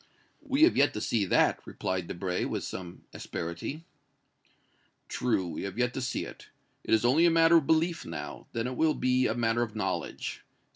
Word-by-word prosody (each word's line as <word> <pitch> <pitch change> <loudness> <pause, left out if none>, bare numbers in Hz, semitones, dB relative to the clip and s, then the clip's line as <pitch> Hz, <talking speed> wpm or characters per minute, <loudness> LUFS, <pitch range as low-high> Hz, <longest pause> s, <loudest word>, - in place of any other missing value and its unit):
"We 285 0 +2
have 340 - +6
yet 145 - +3
to - - -2
see 105 -1 0
that!" - - +3
replied 90 -2 -3
Debray, 90 0 -2
with - - -3
some 90 -2 -7
asperity. 85 - -5 1.2
"True, 115 -7 0
we 85 - -5
have 100 +1 -5
yet 125 0 +1
to 130 - -3
see 130 - -2
it. - - -11 0.4
It - - +3
is 110 - 0
only 155 +8 +5
a - - +6
matter 165 0 +6
of 150 -4 +1
belief 165 +1 +2
now; - - -7
then 115 0 -2
it 125 0 -3
will 160 -1 +3
be 130 0 +2
a 110 - -1
matter 120 0 +1
of 110 -2 -3
knowledge. 95 -5 -3
120 Hz, 190 wpm, -29 LUFS, 95-160 Hz, 1.2 s, have